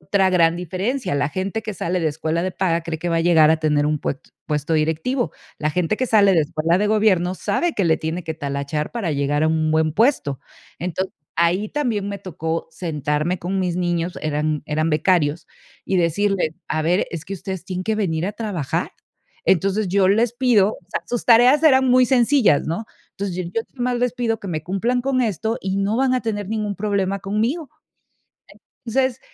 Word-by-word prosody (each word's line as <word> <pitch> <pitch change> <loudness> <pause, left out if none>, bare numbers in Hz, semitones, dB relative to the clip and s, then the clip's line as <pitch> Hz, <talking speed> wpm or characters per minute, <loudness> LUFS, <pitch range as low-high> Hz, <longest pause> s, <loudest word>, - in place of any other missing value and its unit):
Otra 190 +4 +2
gran 170 -2 +4
diferencia, 185 - -2
la 140 0 +1
gente 190 +7 -3
que 215 -2 -6
sale 180 +1 -1
de 165 - 0
escuela 160 +3 -1
de 185 - -2
paga 170 -3 0
cree 165 -2 -5
que 175 - -2
va 165 - +1
a 165 - +2
llegar 165 -2 +5
a 160 - +4
tener 150 -2 +1
un 150 0 0
pue 140 - -2 0.3
puesto 150 +1 -1
directivo. 160 - 0 0.3
La 155 0 0
gente 180 +5 0
que 255 - -1
sale 205 -3 +5
de 165 - +4
escuela 155 +3 +1
de 210 - +1
gobierno 200 -4 +2
sabe 260 - -1
que 195 - 0
le 160 -1 +3
tiene 165 +3 -4
que 160 -1 -4
talachar 140 0 -3
para 215 -9 -2
llegar 145 +1 0
a 155 - +3
un 155 -1 +1
buen 155 0 +2
puesto. 210 - +1 0.4
Entonces, 180 +3 -3 0.2
ahí 175 +5 +1
también 230 -9 -1
me 200 - -4
tocó 165 -3 -4
sentarme 155 +1 -2
con 190 +2 -2
mis 180 -2 -1
niños, 175 -1 -1
eran 150 0 -1
eran 155 +1 0
becarios, 155 -1 +1 0.4
y 190 - 0
decirles: 180 +1 +1 0.2
"A 155 - 0
ver, 175 +5 +1
es 165 -2 -6
que 195 - -5
ustedes 190 -1 -6
tienen 185 0 -4
que 220 +2 -1
venir 170 -5 -1
a 205 - -2
trabajar". 200 - -3 0.5
Entonces, 195 +3 +2
yo 190 +1 +3
les 225 +3 +3
pido 240 -5 +3
o 175 - -31
sea, - - -2
sus 240 - -3
tareas 250 +6 +6
eran 265 -4 +5
muy 250 0 +5
sencillas, 245 - +4
¿no?, 170 +8 -2 0.3
entonces, 195 -2 -4
yo 185 - -2
yo 225 - 0
nomás 245 -1 -1
les 245 -1 +1
pido 235 -3 -1
que 200 - -9
me 160 -4 -3
cumplan 220 +8 0
con 255 0 0
esto, 220 +1 -1
y 190 0 -2
no 200 +3 0
van 260 0 +2
a 255 - +1
tener 205 -3 -3
ningún 215 -2 -2
problema 200 -1 -1
conmigo. 225 - -2 1.2
Entonces, 260 +1 0
185 Hz, 200 wpm, -21 LUFS, 160-220 Hz, 1.2 s, tareas